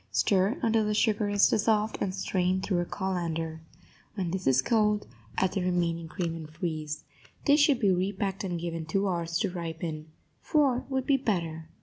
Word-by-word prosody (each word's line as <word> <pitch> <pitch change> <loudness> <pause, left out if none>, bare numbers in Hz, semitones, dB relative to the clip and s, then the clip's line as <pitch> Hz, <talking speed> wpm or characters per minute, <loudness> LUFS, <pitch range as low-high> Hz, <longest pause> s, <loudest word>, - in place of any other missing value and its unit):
Stir 190 - +2
until 225 -1 +3
the 210 0 0
sugar 210 -1 +2
is 205 0 +5
dissolved, 215 0 +1
and 190 - 0
strain 185 -1 0
through 190 -1 0
a 175 - 0
colander. 165 -4 -3 0.5
When 185 -5 -2
this 185 0 -3
is 130 -1 +5
cold, 210 - +2 0.3
add 190 - +2
the 195 - -1
remaining 170 -2 0
cream 170 -1 -3
and 160 -2 -8
freeze. 155 -2 -4 0.4
This 290 +1 +5
should 290 -3 +4
be 205 -5 +3
repacked 195 +1 -1
and 175 -3 -2
given 165 -1 -4
two 195 +5 +1
hours 170 -2 -1
to 200 -4 0
ripen. 165 -3 -5 0.3
Four 275 -5 +2
would 265 -1 -1
be 280 -2 +4
better. 165 -10 -2
185 Hz, 180 wpm, -28 LUFS, 165-210 Hz, 0.5 s, is